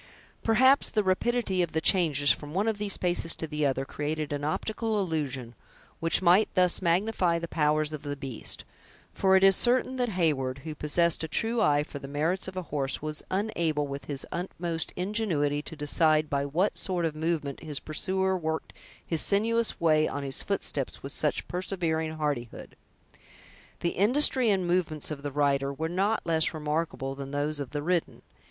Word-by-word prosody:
Perhaps 260 +5 +4
the 215 -2 +1
rapidity 190 0 +1
of 175 - -2
the 160 - +1
changes 155 -6 +4
from 150 +2 -4
one 200 +4 +1
of 220 -2 -1
these 205 -1 -1
paces 175 -2 +1
to - - -4
the 150 -1 0
other 135 0 -1
created 150 +1 -3
an 145 0 -3
optical 215 +7 -1
illusion, 140 -9 -3 0.5
which 165 +3 +2
might 185 +5 +5
thus 180 -1 +3
magnify 180 0 +1
the 170 0 -4
powers 155 -1 +1
of 150 - -5
the 145 -1 -4
beast; 135 -4 -5 0.5
for 190 -1 +3
it 190 - +4
is 195 -1 +7
certain 255 +3 +2
that 245 -1 0
Heyward, 135 -7 0
who 155 -1 -5
possessed 165 +3 +2
a - - -2
true 225 +8 +1
eye 145 0 +3
for 145 - -8
the 135 - -8
merits 160 +7 -1
of 185 0 -7
a 185 - -2
horse, 145 -3 -3
was 155 0 -3
unable, 170 -7 0
with 140 0 -6
his 140 -2 -1
utmost 170 -2 -4
ingenuity, 180 -8 0
to 160 - -10
decide 155 +1 +2
by 140 0 0
what 170 +9 0
sort 180 -3 -1
of 160 - -1
movement 155 -3 -2
his 150 -3 -6
pursuer 190 +5 -1
worked 160 -3 -3 0.3
his 165 -2 0
sinuous 230 +3 +1
way 155 -2 +3
on 145 - -4
his 135 -1 -1
footsteps - - -2
with - - -5
such - - -1
persevering 165 -4 -2
hardihood. 145 -7 -4 1.1
The 170 - +1
industry 245 +5 +3
and 190 -3 +1
movements 175 -4 0
of 145 -2 -5
the 145 0 -4
rider 140 -1 +1
were 160 +3 -3
not 195 +6 0
less 160 -1 +2
remarkable 150 -3 -2
than 135 0 -7
those 145 +1 -2
of 140 -3 -4
the 145 -1 -4
ridden. 175 0 -1
160 Hz, 180 wpm, -28 LUFS, 145-190 Hz, 1.1 s, is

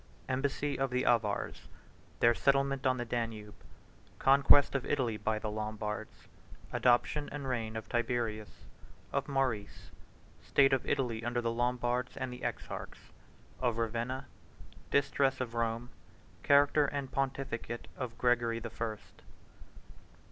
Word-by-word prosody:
—Embassy 140 +2 -1
Of 135 0 +1
The 125 0 0
Avars.—Their 115 +1 0
Settlement 135 +5 +2
On 130 0 +2
The 120 - -3
Danube.—Conquest 120 +5 +1
Of 135 -2 0
Italy 125 -6 0
By 110 +1 -1
The 110 0 -3
Lombards.—Adoption 110 +5 -2
And 145 -2 -5
Reign 115 -3 -2
Of 110 - -5
Tiberius.—Of 115 -3 -4
Maurice.—State 135 +2 -1
Of 135 - 0
Italy 115 -4 0
Under 120 +1 0
The 115 -1 0
Lombards 120 +1 -1
And 130 -2 -3
The 125 - -9
Exarchs.—Of 120 -3 -5
Ravenna.—Distress 130 +3 -2
Of 125 -3 -3
Rome.—Character 120 +5 +1
And 140 -1 -4
Pontificate 135 -3 -3
Of 120 -3 -5
Gregory 120 -2 +2
The 115 -1 -6
First. 110 -2 -6
120 Hz, 105 wpm, -32 LUFS, 115-135 Hz, -, Settlement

